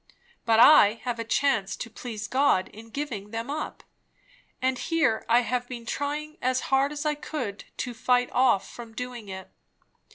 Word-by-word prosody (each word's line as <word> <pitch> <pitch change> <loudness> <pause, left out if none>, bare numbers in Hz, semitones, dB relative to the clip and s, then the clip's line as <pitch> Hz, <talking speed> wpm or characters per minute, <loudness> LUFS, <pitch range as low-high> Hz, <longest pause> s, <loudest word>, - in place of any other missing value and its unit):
but 225 -1 +4
I 230 -5 +8
have 245 -2 -3
a - - -1
chance 225 -4 +1
to - - -6
please 220 -1 -6
God 260 -8 +2
in 225 +2 -13
giving 225 -6 -5
them 230 +4 -4
up; 305 +1 -5 0.8
and 260 -1 0
here 295 -10 +1
I 240 +1 +6
have 245 0 -2
been 240 -2 -7
trying 300 +4 -3
as 255 0 +1
hard 270 +2 +4
as 300 +1 -5
I 300 - +2
could 270 -8 -5
to 245 - -3
fight 245 +1 +1
off 250 -6 +3
from 230 -2 -11
doing 245 -4 -6
it. 190 0 -8
245 Hz, 170 wpm, -26 LUFS, 225-280 Hz, 0.8 s, I